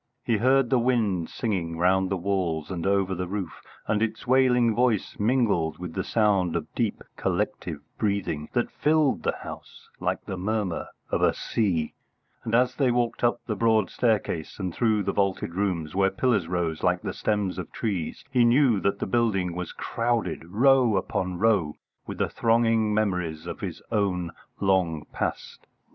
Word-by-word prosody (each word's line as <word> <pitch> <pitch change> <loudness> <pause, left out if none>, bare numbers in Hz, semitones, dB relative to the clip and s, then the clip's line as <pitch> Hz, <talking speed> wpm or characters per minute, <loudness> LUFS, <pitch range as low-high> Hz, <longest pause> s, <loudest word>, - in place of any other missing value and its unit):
He 115 -3 +1
heard 130 +2 +3
the 130 - +4
wind 110 -9 +1
singing 90 -8 -2
round 95 +2 +2
the 95 - 0
walls 90 -4 -1
and 90 0 -2
over 100 -1 +2
the 90 0 -3
roof, 95 -3 -5 0.2
and 105 0 0
its 115 -1 -2
wailing 125 -2 +4
voice 120 -3 0
mingled 105 - +1
with 90 -2 -7
the 95 - -2
sound 100 -6 +2
of 80 -2 -4
deep, 115 -4 -1
collective 80 -5 -2 0.2
breathing 95 -8 -1
that 120 -2 0
filled 155 -2 +2
the - - 0
house - - -10
like - - -2
the 95 - -5
murmur 100 -2 -2 0.2
of - - +1
a - - +3
sea; 90 -8 -1 0.5
and 115 - 0
as 125 +1 +3
they 135 -3 +3
walked 120 -1 0
up 120 0 +2
the 110 - -2
broad 110 -2 +2
staircase 105 -9 0
and 95 -4 -3
through 110 -1 +1
the 100 - 0
vaulted 95 -4 0
rooms, 90 -5 -1
where 95 0 +3
pillars 100 -3 +1
rose 85 -3 -2
like 90 0 +1
the - - -3
stems 105 -3 -1
of 90 - -6
trees, 95 -8 -3
he 125 -2 +4
knew 120 -2 +4
that 100 - 0
the - - -3
building 95 -5 +1
was 90 0 -5
crowded, 115 -6 -2
row 120 +3 +4
upon 90 -1 -2
row, 100 -8 +2 0.3
with - - -6
the - - +1
thronging 115 -1 +2
memories 90 -7 -1
of - - -6
his - - -6
own 95 -5 0 0.3
long 90 -6 +1
past. - - -4
100 Hz, 170 wpm, -26 LUFS, 90-115 Hz, 0.5 s, the